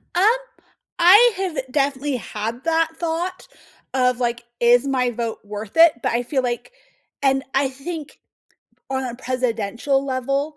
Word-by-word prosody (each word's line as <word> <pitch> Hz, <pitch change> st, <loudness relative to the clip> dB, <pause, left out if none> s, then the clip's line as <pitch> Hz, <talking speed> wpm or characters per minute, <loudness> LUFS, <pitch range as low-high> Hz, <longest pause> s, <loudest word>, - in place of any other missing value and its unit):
Um, 360 Hz, -, +3 dB, 0.8 s
I 415 Hz, +7 st, +7 dB
have 375 Hz, -4 st, -3 dB
definitely 280 Hz, -1 st, 0 dB
had 225 Hz, +2 st, -5 dB
that 330 Hz, 0 st, +2 dB
thought 345 Hz, +2 st, -3 dB, 0.5 s
of, 250 Hz, -1 st, +2 dB
like, 240 Hz, -1 st, -1 dB, 0.2 s
"Is 245 Hz, +3 st, +4 dB
my 250 Hz, -2 st, +1 dB
vote 230 Hz, -1 st, -4 dB
worth 210 Hz, +6 st, -8 dB
it?" 330 Hz, -1 st, +8 dB
But -, -, +1 dB
I 240 Hz, +1 st, 0 dB
feel 260 Hz, +1 st, -1 dB
like 240 Hz, -, -3 dB, 0.5 s
and 270 Hz, 0 st, +2 dB
I 270 Hz, 0 st, +2 dB
think 295 Hz, +3 st, -8 dB, 0.7 s
on 265 Hz, 0 st, -1 dB
a 245 Hz, -2 st, -4 dB
presidential 255 Hz, +1 st, -1 dB
level, 275 Hz, +3 st, -2 dB
265 Hz, 140 wpm, -22 LUFS, 240-305 Hz, 0.8 s, it